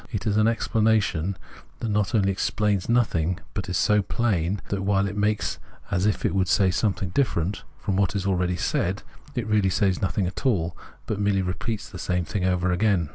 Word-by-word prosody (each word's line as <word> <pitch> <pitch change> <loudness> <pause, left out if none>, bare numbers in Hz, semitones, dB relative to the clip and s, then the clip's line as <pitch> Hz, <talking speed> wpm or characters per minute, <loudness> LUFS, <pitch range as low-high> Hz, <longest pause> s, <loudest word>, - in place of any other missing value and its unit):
It 105 -4 -3
is 105 -2 +1
an 110 +1 +4
explanation 110 -6 +1 0.4
that 115 - -2
not 105 +1 +1
only 100 -2 +3
explains 100 0 0
nothing, 95 -7 +1
but 95 - -4
is 90 - 0
so 105 +1 +3
plain 100 -3 0
that, 100 -1 -1
while 100 0 +2
it 100 - -5
makes 105 0 0 0.3
as 90 +3 +2
if 105 - 0
it - - +1
would 95 -1 +1
say 95 -1 +3
something 95 -1 0
different 95 - 0 0.2
from 95 -2 -2
what 100 -1 +1
is 95 -1 -1
already 90 -2 +1
said, 95 +3 -1 0.3
it 120 -3 -1
really 105 -3 +2
says 95 0 +1
nothing 95 0 0
at 90 - -5
all, 85 -11 +1 0.3
but 105 - -3
merely 100 -2 +2
repeats 100 +4 -3
the 90 - -9
same 90 -1 -1
thing 100 +1 -3
over 90 0 +1
again. 90 -4 +2
100 Hz, 195 wpm, -25 LUFS, 90-105 Hz, 0.4 s, an